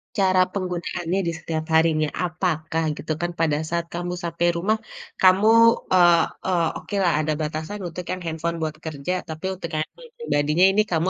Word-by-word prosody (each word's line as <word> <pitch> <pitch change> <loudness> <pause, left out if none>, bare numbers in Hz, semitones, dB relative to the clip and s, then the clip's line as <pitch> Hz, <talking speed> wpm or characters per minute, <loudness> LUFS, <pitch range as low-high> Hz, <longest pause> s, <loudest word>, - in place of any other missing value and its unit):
cara 185 -2 +3
penggunaannya 180 -1 -2
di - - +1
setiap 160 -1 -3
harinya? 160 -1 +3 0.2
Apakah, 165 -2 -1
gitu 155 +1 -3
kan, 175 0 -1
pada 155 -3 +2
saat 170 0 -1
kamu 175 +1 -3
sampai 170 0 0
rumah, 215 +6 +1 0.4
kamu 190 +3 +6 0.4
eee 175 -2 +6 0.2
eee, 175 -3 +2
okelah 195 -4 0
ada 155 0 0
batasan 155 +6 -4
untuk 180 +2 -6
yang 185 - -4
handphone 165 +1 -2
buat 155 -1 -2
kerja. 155 +3 -3 0.2
Tapi, 160 +4 -6
untuk 170 -2 -6
handphone 320 - -5
yang 475 - -41
pribadinya 155 - +2
ini 210 +2 +3
kamu 165 +3 +1
170 Hz, 170 wpm, -23 LUFS, 160-185 Hz, 0.4 s, kamu